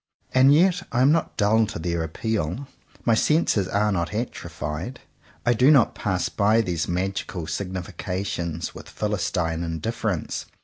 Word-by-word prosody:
And 130 +2 +6
yet 180 +4 +4
I 125 - +3
am 140 - +6
not 165 +1 0
dull 110 +1 +3
to - - -5
their 85 0 -1
appeal. 105 - -2 0.4
My 115 - +4
senses 110 - +2
are 105 +2 +1
not 85 +1 -1
atrophied. 110 - -4 0.5
I 120 - +4
do 125 +4 +4
not 140 -6 +5
pass 95 -3 -1
by 110 +2 +3
these 85 -6 -2
magical 90 -1 -2
significations 90 -2 -4
with - - -11
philistine 80 -1 -1
indifference. 85 +2 -3
100 Hz, 140 wpm, -24 LUFS, 85-120 Hz, 0.5 s, And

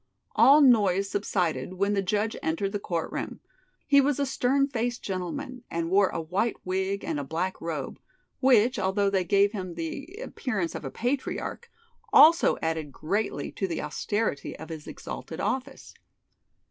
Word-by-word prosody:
All 290 +3 +7
noise 200 -7 +4
subsided 180 -7 -1
when 200 +2 +1
the 200 - +1
judge 210 +3 0
entered 165 +5 -1
the 205 - -2
court 170 -4 -3
room. - - -5 0.5
He 280 -1 +6
was 280 0 +1
a 280 - +2
stern 270 +1 +1
faced 245 -2 -2
gentleman, 190 +7 -4
and 165 0 -2
wore 195 0 +4
a - - -3
white 185 +8 -1
wig 190 +2 -1
and 155 -3 -2
a - - -3
black 170 +6 -3
robe, 155 -5 -4 0.4
which, 250 -2 +4
although 195 +1 +1
they 190 -2 +2
gave 200 +3 +3
him 185 -5 -5
the 170 - -5
appearance 215 - -3
of - - -6
a 135 - -4
patriarch, 260 - -3 0.4
also 330 +2 +7
added 160 -2 -2
greatly 200 +10 -2
to 195 - -2
the 170 - -3
austerity 175 +2 -2
of 160 +1 -9
his 155 -2 -8
exalted - - -7
office. 265 +1 -3
200 Hz, 160 wpm, -27 LUFS, 170-245 Hz, 0.5 s, All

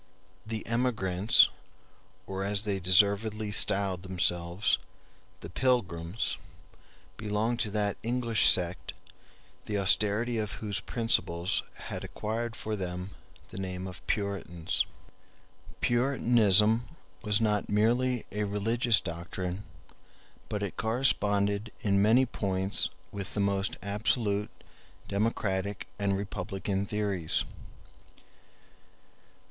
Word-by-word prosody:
The 110 -1 -4
emigrants, 110 -5 +3 0.8
or, 95 0 -4
as 100 0 -1
they 100 -2 -1
deservedly 100 +3 +3
styled 100 -3 +3
themselves, 90 +1 +2 0.6
the 85 - -8
Pilgrims, 95 -6 0 0.8
belonged 110 +2 -1
to 110 - -1
that 105 -1 -1
English 115 -1 +3
sect 90 -1 +2 0.7
the 105 - -2
austerity 105 +4 +2
of 105 -1 -3
whose 105 -3 -3
principles 95 -7 0
had - - -7
acquired 115 +2 -4
for 110 0 -4
them 90 -1 -5 0.4
the 95 - -8
name 95 -1 -4
of 95 -2 -9
Puritans. 95 -4 -2 0.9
Puritanism 120 -3 +3 0.3
was 105 0 +2
not 105 -2 0
merely 120 +4 +1
a 105 0 -2
religious 115 +3 +1
doctrine, 90 +3 -5 0.8
but 105 -1 -2
it 100 - -5
corresponded 105 -3 +1
in 100 -2 +2
many 115 +6 +5
points 95 -4 +2 0.2
with 100 -1 -6
the - - -1
most 100 0 0
absolute 105 0 +1 0.6
democratic 100 -2 -1
and 100 -1 +1
republican 95 0 -3
theories. 100 -6 -1
100 Hz, 100 wpm, -29 LUFS, 95-110 Hz, 0.9 s, many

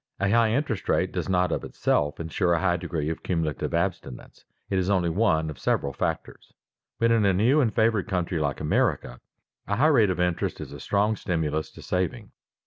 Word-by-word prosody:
A 100 0 +1
high 115 0 +4
interest 125 -2 -2
rate - - +1
does - - -3
not 90 -1 +2
of - - -2
itself 75 0 -1
insure 85 +1 0
a - - 0
high 90 -1 +1
degree 85 -3 -3
of 80 - -6
cumulative 80 -6 -2
abstinence; 60 -3 -4 0.2
it 95 - 0
is 95 +1 -1
only 90 -4 +2
one 80 -5 +2
of 70 - -12
several 70 +1 0
factors. - - -4 0.4
But 115 0 +2
in 115 -2 +3
a 100 -1 +3
new 120 +11 +3
and 115 -5 +1
favored 110 0 +1
country 90 -4 -1
like - - -1
America, 60 0 0 0.5
a 100 - 0
high 130 +8 +2
rate 125 -10 +5
of 90 - -2
interest 90 -1 -1
is - - -8
a 70 - -9
strong 105 +8 +1
stimulus 80 -6 -2
to - - -12
saving. 100 +5 -2
90 Hz, 200 wpm, -26 LUFS, 80-110 Hz, 0.5 s, rate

